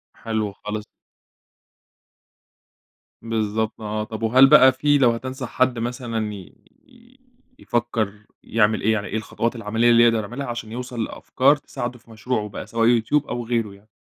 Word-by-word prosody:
حلو 110 -2 -3
خالص. 105 +1 -6 2.4
بالضبط 110 -1 -2
آه، 105 0 -3
طب 110 +1 -7
وهل 130 +4 +6
بقى 130 0 +8
في 145 +3 +2
لو 125 -4 +4
هتنصح 130 +2 -5
حد 130 -2 +1
مثلًا 115 -2 -3
ي 95 -3 -11 0.3
ي 250 0 -22 0.4
يفكر 115 -3 -1 0.3
يعمل 110 -1 +1
إيه، 110 - +2
يعني 105 -2 -2
إيه 110 - -3
الخطوات 115 +2 -2
العمليّة 115 +1 +1
اللي 120 0 +6
يقدر 115 -1 +4
يعملها 120 +7 -5
عشان 120 -2 -6
يوصل 120 -1 -4
لأفكار 135 +5 +2
تساعده 125 -4 -6
في 115 - -20
مشروعه 110 -1 -3
بقى، 100 - -8
سواء 115 +1 +3
YouTube 145 +6 0
أو 120 -1 -3
غيره 115 -3 -1
يعني؟ 100 +2 -19
115 Hz, 155 wpm, -22 LUFS, 110-125 Hz, 2.4 s, بقى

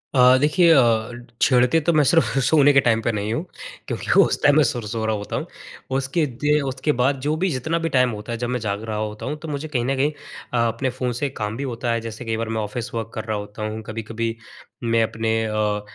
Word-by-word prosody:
अ, 125 0 +7
देखिए 165 +5 +4
अ, 115 -4 +3 0.3
छेड़ते 125 +4 +4
तो 170 - +2
मैं 150 -1 +4
सिर्फ़ 135 -5 +2
सोने 145 -2 +5
के 140 - +6
टाइम 115 -1 +3
पे 115 - 0
नहीं 105 +1 -2
हूँ, 160 +9 -2 0.4
क्योंकि - - -3
उस - - +3
टाइम 145 0 +5
मैं 155 - +6
सुर 120 -3 -1
सो 110 0 -3
रहा 110 -1 +1
होता 105 0 -5
हूँ। - - -2 0.5
उसके 135 +4 0 0.2
दे 150 0 +3
उसके 135 +2 -1
बाद 135 +1 +2
जो 150 +1 +1
भी, 185 +4 0
जितना 155 +5 -1
भी 165 0 -1
टाइम 125 -2 +3
होता 105 +2 -7
है, 115 - -2
जब 120 +1 -3
मैं 125 0 -1
जाग 105 0 -3
रहा 110 -1 -4
होता 105 0 -4
हूँ 150 - -3
तो 160 - -8
मुझे 150 +1 -4
कहीं 125 -6 -1
न 135 +1 0
कहीं 145 +3 +1 0.4
अ, - - +1
अपने 130 +3 -1
फ़ोन 125 0 -3
से 145 - 0
काम 110 -4 -4
भी 140 - -3
होता 120 -2 -2
है, 115 -1 0
जैसे 115 +1 -7
कई 115 -1 -1
बार 115 0 -3
मैं 110 -1 -1
ऑफ़िस 115 +3 -5
वर्क 115 -1 -4
कर 110 - -4
रहा 110 -2 -2
होता 105 +1 -7
हूँ, 110 +1 -5
कभी-कभी 115 +1 -4 0.5
मैं 115 -1 +2
अपने 110 0 -1
अ 105 -1 -1
120 Hz, 250 wpm, -22 LUFS, 110-140 Hz, 0.5 s, अ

